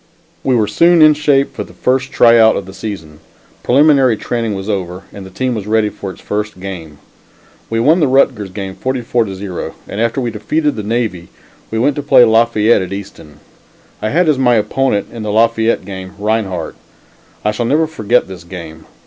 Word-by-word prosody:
We 130 - +2
were 110 -3 +2
soon 170 +11 +4
in 155 0 +7
shape 145 -2 +1
for - - -4
the - - -15
first 130 +1 0
try 115 -2 +5
out 110 0 +5
of 100 - -4
the 95 - -11
season; 95 -7 -7 0.4
preliminary 135 -3 +4
training 115 -2 -3
was 95 +1 -6
over, 95 -3 -3
and 100 -2 -9
the - - -11
team 125 +7 -2
was 105 -3 -5
ready 110 -1 +2
for 100 -1 -7
its 95 - -11
first 105 -2 -4
game. 85 -6 -8 0.7
We 115 - -1
won 155 +9 +4
the 155 - +3
Rutgers 130 -6 +2
game 95 0 -6
44 125 0 -1
to 95 -2 -6
0 95 -2 -6
and 105 - -4
after 115 +3 0
we 120 -2 -2
defeated 145 +8 -1
the 110 - -4
Navy, 105 -5 -2 0.4
we 110 - -3
went 135 +5 +1
to - - -1
play 130 -4 +6
Lafayette 115 -1 +3
at 95 - -5
Easton. 95 -7 -9 0.6
I 110 - -1
had 170 +6 +2
as 150 -4 +2
my 125 -2 +3
opponent 110 -1 0
in 115 - -7
the 105 -1 -3
Lafayette 115 +1 +2
game, 95 -1 -8
Rinehart. 100 -5 -2 0.7
I 105 - +3
shall 115 +2 -2
never 155 +5 +2
forget 125 -6 0
this 95 -3 -10
game. 85 -3 -10
110 Hz, 200 wpm, -15 LUFS, 95-125 Hz, 0.7 s, in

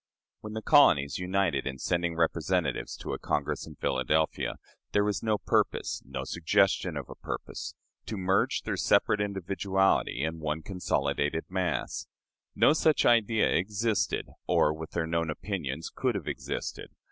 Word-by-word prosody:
When 105 0 -8
the 110 0 -4
colonies 70 +1 +5
united 90 -6 0
in 65 0 -4
sending 85 +4 -1
representatives 80 -1 0
to - - -4
a - - -4
Congress - - -2
in 80 - -10
Philadelphia, 70 +4 0 0.4
there 105 - +4
was 105 -2 -1
no 110 -1 +1
purpose - - 0
no - - -5
suggestion 85 0 +1
of 70 - -5
a - - -8
purpose - - -6 0.3
to 110 - -4
merge 95 +1 +1
their - - -2
separate 105 - +3
individuality 95 -5 +1
in 80 +1 -2
one 80 0 -2
consolidated 75 -4 -1
mass. 90 -3 -2 0.5
No - - +5
such 155 -1 +3
idea 115 -2 +4
existed, 105 +3 0 0.2
or 75 - +3
with 80 0 -7
their 85 -2 0
known 85 0 -1
opinions 80 -3 -4
could 125 -4 0
have 95 -7 -4
existed. - - -4
90 Hz, 145 wpm, -29 LUFS, 80-100 Hz, 0.5 s, colonies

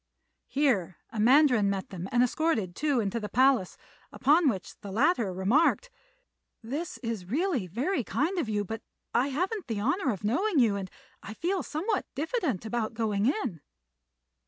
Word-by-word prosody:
Here 240 - +1
a 225 - -5
mandarin 250 -3 +5
met 195 -1 -3
them 185 0 -6
and 245 0 +4
escorted 245 - 0
Tou 290 -4 +1
into 215 +1 -2
a 210 - -4
palace, 255 -7 +3 0.3
upon 300 +3 +4
which 195 -7 -4
the 205 - -8
latter 230 - +2
remarked, 260 - +2 0.7
"This 290 +9 -4
is 225 -6 -3
really 285 - 0
very 255 - -1
kind 305 - -1
of 270 -9 -2
you; 205 -1 0
but 225 +3 -5 0.3
I 245 +3 +3
haven't 365 +7 -2
the 225 -4 -2
honour 275 - +1
of 205 -1 -6
knowing 340 - +1
you, 230 -6 +4
and 195 -2 -4 0.3
I 220 - -8
feel 365 - -1
somewhat 390 +8 -2
diffident 300 - -1
about 225 0 -2
going 215 -2 0
in." 255 - -1
240 Hz, 160 wpm, -28 LUFS, 205-310 Hz, 0.7 s, mandarin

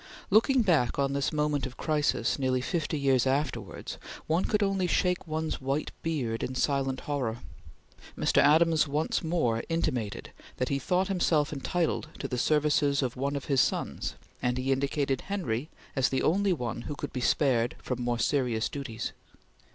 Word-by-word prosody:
Looking 240 +5 +5
back 160 - +2
on 140 -1 +1
this 140 -1 0
moment 150 -2 0
of 130 - -12
crisis, 150 -5 +1
nearly 130 -1 +1
fifty 155 +3 -2
years 135 -3 +3
afterwards, 130 -6 -2 0.3
one 165 +4 +1
could 210 -1 +1
only 195 -2 +1
shake 180 0 +1
one's 155 -1 -2
white 135 +3 -1
beard 130 -9 -2
in 130 - -3
silent 135 -1 0
horror. 130 -6 -2 0.8
Mr. - - +3
Adams 160 +1 +5
once 150 +5 0
more 155 -9 0
intimated 125 -10 -2 0.3
that 125 - -1
he 140 - 0
thought 180 +7 +1
himself 165 -6 +1
entitled 160 +3 -1
to - - -4
the 125 - -2
services 145 -1 +2
of 125 -2 -2
one 140 +2 -1
of 140 - -4
his 135 -3 +3
sons, - - -1 0.3
and 125 0 0
he 130 +1 0
indicated 135 0 0
Henry 155 - -2 0.3
as 135 -3 +3
the 130 - 0
only 195 +4 +3
one 120 -8 -2
who 145 - -3
could 145 - -6
be 125 - -3
spared 120 -3 +2
from 125 -1 -4
more 120 0 0
serious 120 -2 +1
duties. 125 -5 -5
140 Hz, 165 wpm, -29 LUFS, 130-160 Hz, 0.8 s, Looking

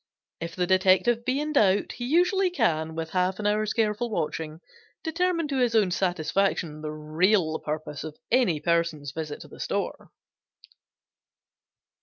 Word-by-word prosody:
If 165 0 -6
the 180 - +1
detective 190 +6 +3
be 260 +2 +1
in 300 +1 -2
doubt 205 -7 +3
he 240 - -6
usually 360 +6 +3
can, 160 - 0
with 160 -1 -4
half 185 0 +1
an 210 - -5
hour's 210 +1 +1
careful 225 +1 0
watching, 160 -5 -3 0.4
determine 335 0 0
to 275 - -1
his 240 -2 +2
own 205 -5 +4
satisfaction 175 -2 0
the 155 - -4
real 155 +3 +1
purpose 150 -1 -5
of 155 -1 -8
any 230 -11 +3
person's 165 -4 0
visit 155 0 -5
to - - -10
the - - -14
store. - - -3
185 Hz, 150 wpm, -26 LUFS, 160-240 Hz, 0.4 s, own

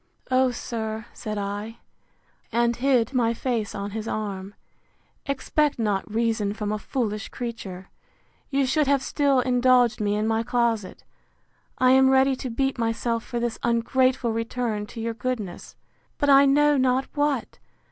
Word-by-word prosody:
O 255 0 +4
sir, 220 -2 -4
said 215 -2 -5
I, 205 +3 -4 0.7
and 235 0 +2
hid 255 -1 +2
my 235 -2 +2
face 230 -4 -2
on 200 0 -4
his 220 +1 -5
arm; 200 -2 -4 0.7
expect 285 +2 0
not 210 -3 -1
reason 220 -2 0
from 210 -1 -3
a 215 - -2
foolish 215 -4 -3
creature: 205 -7 -7 0.6
You 275 -1 +1
should 295 +2 +1
have 280 -1 +2
still 280 -3 +2
indulged 250 -2 +3
me 205 0 +1
in 210 +1 0
my 225 0 +1
closet: 235 -4 -1 0.7
I 255 0 +4
am 265 0 +6
ready 265 0 +4
to 255 - -5
beat 270 +2 -1
myself 230 0 -1
for 240 - -4
this 235 -1 -2
ungrateful 245 +1 +1
return 230 -2 -2
to 230 - -9
your 230 0 -2
goodness. 225 -5 -5 0.4
But 285 -1 +2
I 275 0 +7
know 295 +1 +4
not 260 0 +2
what! 290 -4 -1
235 Hz, 150 wpm, -25 LUFS, 215-260 Hz, 0.7 s, I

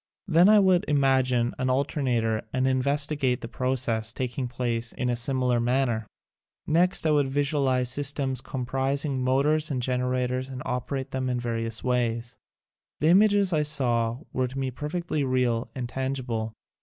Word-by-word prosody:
Then 175 +2 +5
I 215 - +7
would 190 -3 +4
imagine 130 -4 +2
an 130 0 0
alternator 125 -5 0
and 130 0 0
investigate 140 0 0
the - - -5
processes 120 -3 -1
tak 125 0 -4
ing 130 -2 -2
place 120 -1 -3
in 125 -1 -1
a - - 0
similar 125 0 0
manner. 120 -2 0 0.6
Next 175 +3 +2
I 155 - +3
would 145 -2 +3
visualize 135 -3 +1
systems 135 -1 0
comprising 135 +1 -2
motors 150 +5 +1
and 135 -4 -2
generators 125 +1 -1
and 130 -1 -7
operate 130 +2 -3
them 130 -1 -2
in 125 -1 -1
various 115 -2 -3
ways. 120 -1 -1 0.6
The 155 - +2
images 200 0 +4
I 155 - +2
saw 125 -5 +1
were 130 0 0
to 130 +2 -8
me 135 -1 -2
per 145 +4 -6
fectly 170 -3 -2
real 125 -2 0
and 125 -2 -3
tangible. 125 -4 -3
130 Hz, 155 wpm, -26 LUFS, 125-140 Hz, 0.6 s, I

